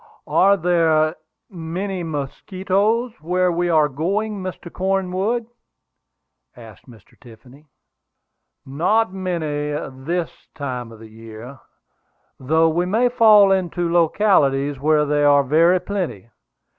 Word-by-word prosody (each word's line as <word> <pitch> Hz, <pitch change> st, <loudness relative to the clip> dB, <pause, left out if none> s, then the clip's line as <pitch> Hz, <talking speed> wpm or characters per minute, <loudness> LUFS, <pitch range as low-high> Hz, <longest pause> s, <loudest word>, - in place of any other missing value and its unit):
"Are 200 Hz, +1 st, +3 dB
there 165 Hz, -2 st, +1 dB, 0.3 s
many 185 Hz, +1 st, -5 dB
mosquitoes 190 Hz, -, -2 dB
where 180 Hz, +2 st, 0 dB
we 175 Hz, +1 st, -1 dB
are 155 Hz, -3 st, +3 dB
going, 195 Hz, +9 st, -3 dB
Mr. 185 Hz, -2 st, -8 dB
Cornwood?" 195 Hz, +4 st, -1 dB, 1.1 s
asked 115 Hz, +1 st, -15 dB
Mr. 110 Hz, -6 st, -18 dB
Tiffany. 125 Hz, +6 st, -17 dB, 1.0 s
"Not 185 Hz, +10 st, 0 dB
many 160 Hz, -6 st, -3 dB
at 130 Hz, -2 st, -7 dB
this 175 Hz, -1 st, -2 dB, 0.3 s
season 125 Hz, -5 st, -5 dB
of 115 Hz, -, -13 dB
the 110 Hz, +1 st, -13 dB
year, 115 Hz, +4 st, -11 dB, 0.8 s
though 160 Hz, +5 st, +2 dB
we 175 Hz, +3 st, -1 dB
may 230 Hz, +6 st, +2 dB
fall 215 Hz, -5 st, +5 dB
into 175 Hz, -2 st, -1 dB
localities 145 Hz, -6 st, +2 dB
where 150 Hz, +1 st, +2 dB
they 145 Hz, 0 st, 0 dB
are 145 Hz, -1 st, +5 dB
very 165 Hz, +6 st, +3 dB
plenty. 175 Hz, -, -5 dB
165 Hz, 115 wpm, -20 LUFS, 145-190 Hz, 1.1 s, fall